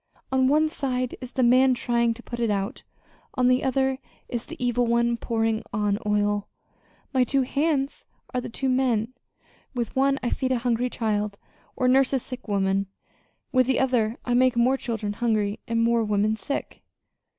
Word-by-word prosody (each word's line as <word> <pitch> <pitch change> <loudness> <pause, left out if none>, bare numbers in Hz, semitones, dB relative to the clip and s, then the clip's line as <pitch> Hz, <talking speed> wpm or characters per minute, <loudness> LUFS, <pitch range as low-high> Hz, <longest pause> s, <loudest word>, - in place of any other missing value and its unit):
On 260 0 +3
one 305 +3 +4
side 255 -4 -2
is 255 -1 -7
the 260 - +1
man 255 +2 +5
trying 235 -2 +1
to 240 - -12
put 240 - -6
it 230 -2 +1
out; 205 +4 -2 0.5
on 250 -2 +3
the 255 0 +3
other, 265 0 +1 0.3
is 240 -1 -4
the - - -7
evil 245 -1 +1
one 235 0 +2
pouring 225 -1 -1
on 205 0 0
oil. 205 0 +1 0.7
My 260 -1 +4
two 265 +2 +1
hands 280 +1 -1 0.3
are 250 - 0
the - - -6
two 265 +3 -3
men. 255 -3 +1 0.6
With 235 -3 -3
one 275 +1 +3
I 240 - 0
feed 260 -1 -1
a - - +1
hungry 240 +1 0
child, 210 -4 -1 0.4
or 255 - +1
nurse 265 +1 +4
a 265 - +3
sick 255 0 -9
woman; 195 -1 +1 0.6
with 255 -2 +3
the 265 - +2
other 240 -4 +1
I 245 - 0
make 255 0 +4
more 250 +3 +4
children 225 -5 -3
hungry 215 -2 0
and 230 0 +1
more 230 0 +3
women 210 0 +1
sick." 280 +6 -5
240 Hz, 180 wpm, -25 LUFS, 220-260 Hz, 0.7 s, man